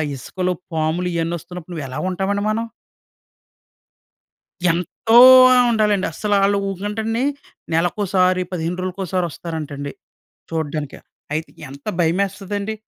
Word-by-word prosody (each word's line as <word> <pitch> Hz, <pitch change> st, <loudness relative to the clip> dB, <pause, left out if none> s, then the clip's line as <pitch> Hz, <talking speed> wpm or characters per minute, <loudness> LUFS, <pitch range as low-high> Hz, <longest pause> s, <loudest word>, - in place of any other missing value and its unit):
ఇసుకలో 180 Hz, +8 st, -3 dB, 0.2 s
పాములు 160 Hz, +3 st, 0 dB
ఇయన్నీ 165 Hz, 0 st, -1 dB
వస్తున్నప్పుడు 180 Hz, +1 st, -10 dB
నువ్వు 155 Hz, -4 st, -4 dB
ఎలా 130 Hz, -, -5 dB
ఉంటామండి 200 Hz, +2 st, -1 dB
మనం? 225 Hz, +2 st, -1 dB, 2.0 s
ఎంతో 180 Hz, +7 st, +1 dB, 0.4 s
ఆహ్, 250 Hz, -1 st, +5 dB
ఉండాలండి. 210 Hz, -3 st, +2 dB
అసలు 205 Hz, +4 st, 0 dB
ఆళ్లు 200 Hz, +1 st, +3 dB
ఊకంటండి. 215 Hz, +5 st, -2 dB, 0.5 s
నెలకోసారి, 185 Hz, +2 st, +2 dB
15 175 Hz, 0 st, -3 dB
రోజులకోసారి 185 Hz, -1 st, -2 dB
వస్తారంటండి 145 Hz, -4 st, -6 dB, 0.6 s
చూడ్డానికి. 155 Hz, -3 st, -3 dB, 0.4 s
అయితే, 160 Hz, +2 st, -3 dB, 0.2 s
ఎంత 140 Hz, +1 st, -12 dB, 0.2 s
భయమేస్తదండి! 200 Hz, +4 st, -1 dB
180 Hz, 100 wpm, -20 LUFS, 165-205 Hz, 2.0 s, ఆహ్